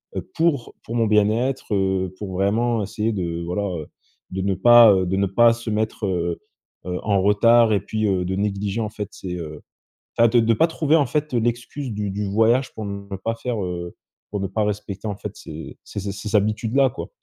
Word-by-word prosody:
heu, - - -1
pour 160 -7 0
pour 115 - -6
mon 115 -2 +2
bien-être, 110 +4 +1
heu, 95 -1 0
pour 100 -3 -5
vraiment 110 +5 +1
essayer 105 +3 -2
de 85 -3 -3
voilà, 90 +4 -2
heu, 85 -6 -4 0.4
de 95 +1 -3
ne 95 0 +1
pas, 120 +1 +8
heu, 95 -1 +1
de 95 +2 0
ne 100 - +2
pas 115 +4 +5
se 115 0 -6
mettre, 110 0 -1
heu, 85 -2 -1 0.5
heu, 90 0 -3
en 100 -2 +2
retard 110 +3 +5
et 100 - +1
puis, 110 +1 -2
heu, 95 -2 +1
de 95 +1 -2
négliger 100 +1 -2
en 110 - -2
fait 105 -1 -6
ces, 90 -2 -6
heu, 75 -3 -7 0.6
enfin 115 - +6
de-de 115 -1 +3
pas 165 +10 +3
trouver 160 -1 +1
en 145 - +3
fait 150 +1 -2
l'excuse 120 +3 -2
du 105 -1 -3
du 105 +1 -3
voyage 115 +5 +2
pour 110 - -5
ne 100 0 -6
pas 115 +4 -2
faire, 115 -3 -3
heu, 85 -1 -5 0.4
pour 105 - -2
ne 95 - -1
pas 105 +3 -1
respecter 105 0 -4
en 105 - -3
fait 100 - -7
ces 80 +1 -9
ces - - -7
ces 100 +1 -3
ces 105 +2 -4
habitudes 110 +3 +1
là 135 -1 +5
quoi. 135 - -7
105 Hz, 215 wpm, -22 LUFS, 95-115 Hz, 0.6 s, pas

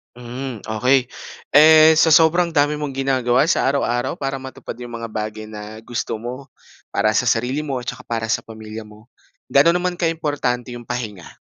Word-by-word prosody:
Hmm, 125 0 -7
okey. 125 +4 +2 0.5
Eh 155 +1 +8
sa 160 0 +4
sobrang 170 +2 +4
dami 145 -1 +2
mong 150 -1 -4
ginagawa 130 0 +1
sa - - +2
araw-araw 120 -3 0
para 135 0 -2
matupad 130 -1 -8
yung 120 -1 -8
mga 115 - -5
bagay 110 0 -5
na 105 0 -9
gusto 115 -1 -4
mo 125 +4 -8 0.4
para 110 0 +1
sa 120 - +3
sarili 125 +4 0
mo 135 -4 -3
at 125 - -11
saka - - -5
para 115 -1 -3
sa 115 +1 0
pamilya 110 0 -9
mo, 105 +2 -17 0.4
ga'no 140 +5 +5
naman 180 0 -1
ka 170 -2 0
importante 140 -6 -2
yung 120 - -9
pahinga? 110 -8 -6
125 Hz, 180 wpm, -20 LUFS, 115-145 Hz, 0.5 s, Eh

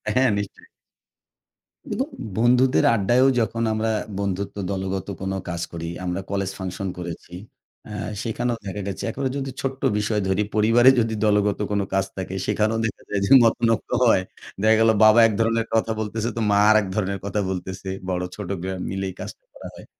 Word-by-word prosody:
হ্যাঁ, 130 0 +4
নিশ্চয়ই। 100 -1 -6 1.2
উন - - -3 0.4
বন্ধুদের 125 +2 +4
আড্ডায়ও 120 +5 +3
যখন 115 +1 -1
আমরা 110 +1 0 0.3
বন্ধুত্ব 100 0 -3
দলগত 95 -1 -3
কোন 95 0 -2 0.2
কাজ 85 -1 -3
করি, 85 -1 -5 0.2
আমরা 90 +1 -2
কলেজ 100 -1 -1
ফাংশন 95 +1 -4
করেছি। 85 0 -7 0.5
অ্যা 105 -1 -6 0.2
সেখানেও 120 +1 -2
দেখা 100 +1 -4
গেছে, 95 - -5
একেবারে 135 +3 -2
যদি 135 -1 -3
ছোট্ট 135 0 -4 0.2
বিষয় 105 0 0
ধরি। 95 +2 +1
পরিবারে 115 +4 +6
যদি 110 -1 0
দলগত 105 -1 +2
কোন 100 -1 +1
কাজ 95 -1 +2
থাকে, 95 0 -5
সেখানেও 110 +1 +1
দেখা 110 - -6
যায় 100 - 0
যে, - - -2
মতনৈক্য 115 0 +1
হয়। 110 -6 +4 0.4
দেখা 110 +1 +5
গেল, 115 0 +5
বাবা 110 +2 +7
এক - - -2
ধরনের 115 0 +1
কথা 115 0 +2
বলতেছে, 110 +1 -2
তো - - -1
মা 100 - +4
আরেক 110 -2 +4
ধরনের 100 -1 -1
কথা 100 +1 -1
বলতেছে, 95 +1 -5 0.2
বড় 90 0 -1
ছোট 105 -4 -7
বে 95 - -3 0.2
মিলেই 95 0 -3
কাজটা - - -8
করা - - -9
হয়। - - -13
105 Hz, 170 wpm, -23 LUFS, 95-115 Hz, 1.2 s, বাবা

